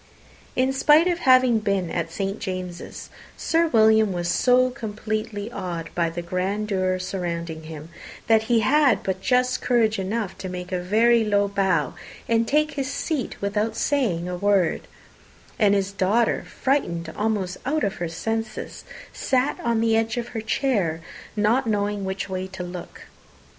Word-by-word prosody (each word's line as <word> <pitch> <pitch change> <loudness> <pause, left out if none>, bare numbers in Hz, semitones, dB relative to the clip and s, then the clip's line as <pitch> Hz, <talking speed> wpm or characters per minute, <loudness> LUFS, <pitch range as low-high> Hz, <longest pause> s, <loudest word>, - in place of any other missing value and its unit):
In 260 +1 +2
spite 300 +4 +5
of 350 -1 0
having 255 -5 +5
been 195 -5 -1
at 165 -1 -2
St. 195 +3 -3
James's, 185 -2 -6 0.3
Sir 330 +1 +2
William 220 -5 +4
was 175 -1 -2
so 255 +7 +3
completely 215 -2 -4
awed 175 -6 -5
by 170 -1 +1
the 170 +1 -5
grandeur 185 +1 -1
surrounding 170 -3 -4
him, 155 0 -9 0.4
that 220 -1 +3
he 230 -1 +3
had 285 +5 +3
but 190 -1 -2
just 250 +3 +1
courage 225 -3 +2
enough 200 +1 -2
to 185 - -5
make 180 +1 -6
a 180 - 0
very 225 +5 +3
low 205 -1 +2
bow, 190 -6 +1 0.3
and 230 0 +2
take 305 +3 +2
his 275 -3 -3
seat 285 -1 -3
without 210 +2 0
saying 225 -10 0
a 180 - -3
word; 195 -2 +1 0.7
and 205 -2 +4
his 195 0 0
daughter, 200 +4 +1
frightened 170 - -1
almost 205 -4 -1
out 300 +4 0
of 200 - -1
her 175 -1 -3
senses, 225 +5 -4 0.3
sat 260 +1 0
on 235 -2 +1
the 225 -1 +3
edge 225 +1 0
of 240 0 -3
her 225 - -4
chair, 215 - 0 0.3
not 225 +5 +2
knowing 205 -2 -1
which 190 +1 -3
way 185 -1 -4
to 190 -1 -7
look. 175 0 -8
210 Hz, 160 wpm, -24 LUFS, 185-235 Hz, 0.7 s, spite